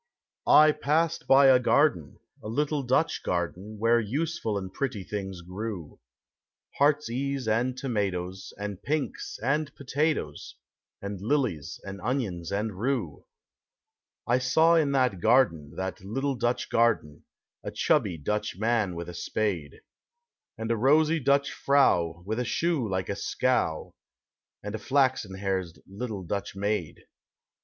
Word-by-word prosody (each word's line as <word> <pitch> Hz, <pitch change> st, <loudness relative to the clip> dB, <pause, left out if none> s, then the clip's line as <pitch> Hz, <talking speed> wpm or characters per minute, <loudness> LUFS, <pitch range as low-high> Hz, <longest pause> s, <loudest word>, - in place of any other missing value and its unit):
I 155 Hz, 0 st, +8 dB
passed 155 Hz, +3 st, 0 dB
by 135 Hz, +1 st, +7 dB
a 130 Hz, -1 st, +7 dB
garden, 125 Hz, -, +2 dB, 0.2 s
a -, -, -8 dB
little 145 Hz, +6 st, 0 dB
Dutch 135 Hz, +5 st, +1 dB
garden. 90 Hz, +4 st, -3 dB
Where 115 Hz, +2 st, +3 dB
useful 130 Hz, 0 st, -2 dB
and 95 Hz, -1 st, -6 dB
pretty 125 Hz, -8 st, -3 dB
things 95 Hz, -3 st, -5 dB
grew, 90 Hz, -2 st, -6 dB, 0.4 s
— -, -, -27 dB
lieart's 150 Hz, +1 st, +4 dB
case 135 Hz, +1 st, -2 dB
and 120 Hz, +4 st, +1 dB
tomatoes, 95 Hz, -7 st, -3 dB
and 100 Hz, -1 st, -5 dB
pinks 150 Hz, +4 st, -3 dB
and 140 Hz, +3 st, 0 dB
pota 150 Hz, +3 st, 0 dB
toes, 75 Hz, -, -7 dB, 0.5 s
And 100 Hz, -2 st, -5 dB
lilies 115 Hz, -, -1 dB
and 100 Hz, 0 st, -8 dB
onions 105 Hz, -9 st, -2 dB
and 100 Hz, -1 st, -2 dB
rue. 115 Hz, -, -2 dB, 1.0 s
I 120 Hz, +2 st, +2 dB
saw 160 Hz, +6 st, +4 dB
in 155 Hz, -4 st, +3 dB
that 125 Hz, -8 st, +2 dB
garden, 85 Hz, -, +2 dB
that 95 Hz, -1 st, -4 dB
little 135 Hz, +8 st, -1 dB
Dutch 120 Hz, 0 st, -1 dB
garden, 115 Hz, -11 st, +1 dB, 0.4 s
A -, -, -4 dB
chubby 115 Hz, -, +1 dB
Dutch 105 Hz, +8 st, -2 dB
man 110 Hz, -4 st, +1 dB
with 85 Hz, 0 st, -5 dB
a 90 Hz, -, -7 dB
spade, 85 Hz, -3 st, -3 dB, 0.8 s
And 115 Hz, +1 st, -3 dB
a 115 Hz, -, +1 dB
rosy 155 Hz, +7 st, +4 dB
Dutch 140 Hz, +1 st, +2 dB
frau 90 Hz, -12 st, +2 dB
with 110 Hz, +4 st, -2 dB
a -, -, +1 dB
shoe 145 Hz, -1 st, 0 dB
like 95 Hz, -1 st, -2 dB
a 100 Hz, -, -1 dB
scow. 105 Hz, -6 st, -1 dB, 0.7 s
And 105 Hz, 0 st, -5 dB
a 110 Hz, -, -3 dB
Haxen 130 Hz, -6 st, +1 dB
haired 95 Hz, -3 st, -2 dB
little 100 Hz, 0 st, -5 dB
Dutch 100 Hz, +2 st, -4 dB
maid. 100 Hz, -6 st, -2 dB
110 Hz, 140 wpm, -27 LUFS, 95-135 Hz, 1.0 s, I